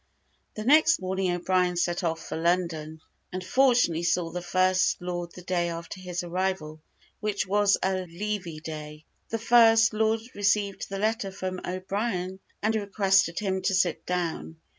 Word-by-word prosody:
The 215 - -4
next 300 +7 +5
morning, 190 0 -1
O'Brien 180 0 +1
set 175 +1 0
off 165 -1 -2
for - - -4
London, 165 -2 -1 0.3
and 185 0 -4
fortunately 245 -7 +3
saw 170 0 0
the 180 +1 -4
First 185 +1 +2
Lord 175 -1 -4
the 180 - -11
day 175 -1 0
after 170 +2 -6
his 180 -1 -4
arrival, 175 -3 -3 0.4
which 210 -1 -1
was 205 +1 +3
a 185 -1 0
levee 175 -3 -4
day. 150 -1 -8 0.2
The 225 - -1
First 225 -1 +5
Lord 220 +1 +1
received 200 0 0
the 195 - -4
letter 215 0 0
from 185 -1 -5
O'Brien, 185 0 -3 0.2
and 220 +1 +2
requested 195 -4 +2
him 190 -2 -1
to 190 +1 +1
sit 180 -3 +1
down. 170 -2 -3
185 Hz, 155 wpm, -27 LUFS, 175-205 Hz, 0.4 s, next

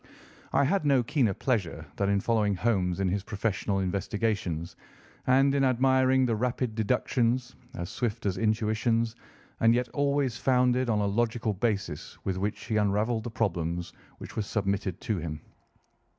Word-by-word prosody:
I - - +3
had 175 +6 +1
no 140 -4 +3
keener 120 - +1
pleasure 95 - -1
than 100 -1 +1
in 100 -1 +2
following 105 -3 +1
Holmes 95 -4 0
in 95 - +1
his 100 +2 -1
professional 100 -1 -1
investigations, 95 -3 -2 0.5
and 135 +2 +4
in 140 -1 +2
admiring 130 0 +3
the 115 -2 +1
rapid 125 0 -1
deductions, 120 +2 0 0.2
as 85 -6 -5
swift 120 -3 -3
as 95 -2 +1
intuitions, 110 +1 +1 0.4
and 115 +1 +5
yet 125 -1 0
always 140 -3 0
founded 125 -1 +2
on 105 -2 +2
a - - +1
logical 110 +1 0
basis 100 -7 -2
with 95 -1 -2
which 100 +1 -3
he 110 -2 0
unravelled 105 +2 +1
the - - -3
problems 90 -7 -2 0.2
which - - -10
were - - 0
submitted 100 -3 -2
to 110 -5 -1
him. 75 -2 -5
110 Hz, 155 wpm, -28 LUFS, 100-125 Hz, 0.5 s, and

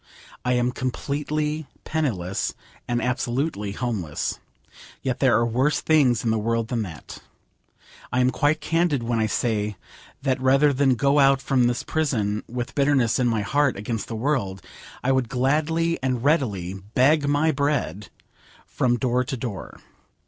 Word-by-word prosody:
I 125 - +1
am 125 0 +1
completely 150 +4 -2 0.2
penniless, 105 - -2 0.3
and 120 0 0
absolutely 125 -4 -1
homeless. 105 - -3 0.6
Yet 130 -2 -1
there 130 -5 +4
are 120 - +2
worse 130 +6 +1
things 140 -7 +3
in 115 - +1
the 110 - +1
world 115 +1 -1
than 120 -3 -1
that. 80 -8 -8 0.9
I 125 - +1
am 125 0 +3
quite 155 +2 +1
candid 165 -5 +1
when 115 -1 0
I 110 - +2
say 105 -2 -1 0.5
that 130 -2 0
rather 135 +2 +4
than 135 -1 +3
go 140 +3 +3
out 135 -1 +5
from 130 -2 +2
this 120 0 -1
prison 110 -10 -1
with 120 0 -4
bitterness 140 -4 +2
in 125 - +2
my 115 -2 +1
heart 145 +6 +1
against 105 +1 -3
the 115 - -5
world, 110 - -1 0.4
I 130 - +2
would 130 -3 +1
gladly 155 +6 +1
and 130 -2 -1
readily 110 - +1 0.2
beg 145 +3 +4
my 145 +2 +3
bread 140 - -1 0.6
from 120 -1 0
door 125 +1 +1
to 135 0 -4
door. 115 -6 -6
125 Hz, 155 wpm, -24 LUFS, 115-145 Hz, 0.9 s, out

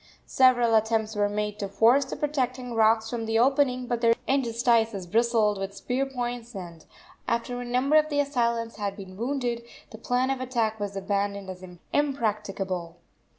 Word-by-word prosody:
Several 245 -3 +4
attempts 220 0 +1
were 205 0 +1
made 210 0 -3
to 200 - -2
force 235 +7 +4
the 265 - -6
protecting 255 -4 -2
rocks 225 0 +3
from 230 -1 -4
the 225 0 +1
opening, 255 0 +2
but 240 -1 -2
their 230 -1 +4
interstices 235 -6 +1
bristled 220 +1 +2
with 195 +1 -5
spear 260 +6 -2
points, 245 -3 -5
and, 170 -4 -8 0.4
after 245 +1 -1
a - - -5
number 255 +5 +2
of 310 0 +3
the 290 -1 0
assailants 235 -5 0
had 200 -1 -3
been 190 -2 -10
wounded, 240 +1 -2 0.3
that 220 -1 -11
plan 250 +2 +1
of 265 -1 -2
attack 230 -4 -1
was 200 -1 -4
abandoned 200 0 -2
as 185 0 -11 0.3
impracticable. 205 - -1
230 Hz, 165 wpm, -26 LUFS, 210-250 Hz, 0.4 s, Several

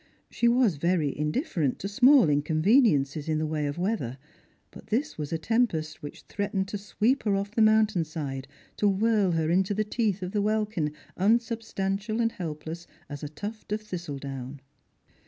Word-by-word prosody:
She 235 - +1
was 235 - +3
very 165 -2 +1
indifferent 150 - -1
to 195 - -4
small 255 +6 +6
inconreniences 155 - +2
in 155 - +1
the 155 - 0
way 155 -1 -1
of 145 - -4
weather, 175 - -2 0.5
but - - -13
this 275 +8 -1
was 150 -2 -5
a 165 - 0
tempest 160 -6 0
which 145 - -9
threatened 200 -1 -2
to 205 - -4
sweep 220 +6 +1
her 205 -2 +1
off 200 +1 -2
the 225 - +1
mountain 215 -4 +4
side, 140 -4 -5 0.3
to 210 - +2
whirl 205 -2 +2
her 160 0 +1
into 190 +3 +2
the 215 - +1
teeth 210 -3 -1
of 180 - -4
the 205 -1 0
welkin, 210 -7 0 0.3
unsubstantial 220 -1 0
and 230 -1 +2
helpless 165 -1 -6 0.2
as 145 -1 -7
a 150 - -5
tuft 205 +8 -7
of 215 +1 -1
thistledown. 140 -8 -6
190 Hz, 170 wpm, -27 LUFS, 155-215 Hz, 0.5 s, small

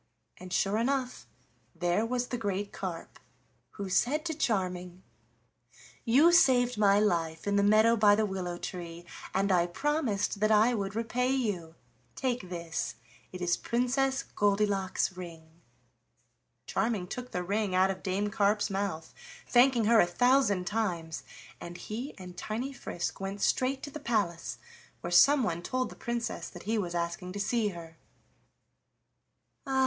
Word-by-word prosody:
And 185 0 -10
sure 200 +4 +1
enough 255 +1 -1 0.5
there 175 +5 +1
was 245 0 -2
the 245 - -2
great 200 -1 -3
carp, 180 -4 -6 0.5
who 200 -2 -5
said 280 - +1
to 325 - -1
Charming: 185 - -2 1.0
"You 275 +9 +6
saved 250 -7 +5
my 205 -1 +4
life 165 -6 0
in 200 0 +1
the 200 - +4
meadow 215 +3 +5
by 205 -2 +5
the 215 +1 +1
willow 185 -3 -4
tree, 170 -1 -7 0.3
and 195 +1 +1
I 175 -2 +3
promised 230 - -1
that 215 +1 +2
I 220 +3 +5
would 200 -3 -3
repay 235 +3 0
you. 205 -11 -1 0.4
Take 245 -8 -2
this, 170 -2 -4 0.4
it 185 - -8
is 175 -1 +2
Princess 265 +3 0
Goldilock's 200 -2 0
ring." 165 -2 -11 1.0
Charming 220 -5 -1
took 250 +7 -6
the 180 - -3
ring 200 0 -1
out 190 +1 +4
of 190 - -7
Dame 200 +2 -1
Carp's 205 0 +1
mouth, 195 -5 -3 0.3
thanking 245 -2 +4
her 225 +1 +5
a 175 - +5
thousand 245 -2 +3
times, 175 -6 -2 0.4
and 175 0 -8
he 240 +10 -6
and 180 -2 -10
tiny 235 +9 -4
Frisk 175 -8 -5
went 195 +1 -4
straight 265 +5 +1
to 285 - -6
the 305 - -7
palace, 190 - -1 0.4
where 175 - -5
someone 215 - +5
told 255 +7 -2
the - - -10
Princess 235 -1 -4
that 175 - -11
he 220 +2 0
was 175 -3 -3
asking 170 +1 -3
to 205 - -5
see 220 +2 +1
her. 165 -4 -8 1.7
"Ah! 265 -1 +1
205 Hz, 150 wpm, -30 LUFS, 180-240 Hz, 1.7 s, You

